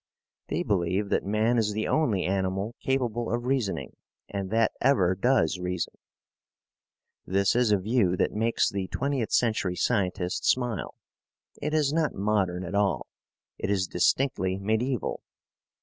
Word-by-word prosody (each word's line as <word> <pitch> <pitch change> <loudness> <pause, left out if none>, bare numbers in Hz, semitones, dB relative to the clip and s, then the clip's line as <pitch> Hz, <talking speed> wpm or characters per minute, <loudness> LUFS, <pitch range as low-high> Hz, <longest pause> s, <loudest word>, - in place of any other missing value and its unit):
They - - -1
believe 95 +1 0
that - - +1
man 110 +3 +2
is 105 -2 0
the 110 +1 -1
only 115 - +1
animal 95 +3 -1
capable 120 -3 -1
of 120 +1 -1
reasoning 110 - -1 0.3
and 100 -2 -4
that 110 +1 +2
ever 110 -10 +4
does 95 -4 +2
reason. 90 -1 -3 1.3
This 100 +2 +1
is 120 -3 +3
a 105 - +5
view 95 -2 +1
that - - +1
makes 115 +2 +1
the 95 -1 -2
twentieth 135 -2 -2
century 110 -6 +1
scientist 90 -4 0
smile. 125 -6 0 0.7
It 150 +2 -1
is 150 -2 +2
not 160 -3 +1
modern 95 -3 0
at 90 +1 -6
all. 100 -1 +1 0.5
It - - -2
is 95 -2 +1
distinctly 95 0 +1
mediaeval. 110 +5 -1
105 Hz, 140 wpm, -27 LUFS, 95-120 Hz, 1.3 s, a